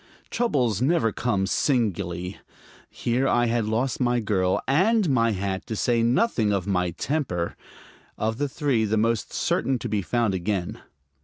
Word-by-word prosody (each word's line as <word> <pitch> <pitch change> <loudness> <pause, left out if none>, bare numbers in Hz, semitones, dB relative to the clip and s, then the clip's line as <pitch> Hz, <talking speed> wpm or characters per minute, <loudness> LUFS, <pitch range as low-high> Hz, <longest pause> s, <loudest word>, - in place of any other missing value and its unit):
Troubles 125 - +1
never 140 -4 +2
come 100 -4 0
singly. 95 - -1 0.5
Here 125 +3 -1
I 120 -2 +3
had 115 -1 0
lost 120 +4 -1
my 120 -1 +2
girl 95 -4 +1
and 195 - +3
my 115 -3 +3
hat, 95 -1 -3
to 110 - -3
say 115 +2 +1
nothing 120 - +2
of 100 -3 0
my 90 -3 0
temper 90 - -2 0.6
of 110 +1 -2
the 145 -1 0
three 135 -5 0
the 110 0 0
most 115 0 0
certain 135 -1 0
to 120 - -5
be 105 -2 -1
found 115 +1 0
again. 95 -1 -2
115 Hz, 155 wpm, -25 LUFS, 100-130 Hz, 0.6 s, I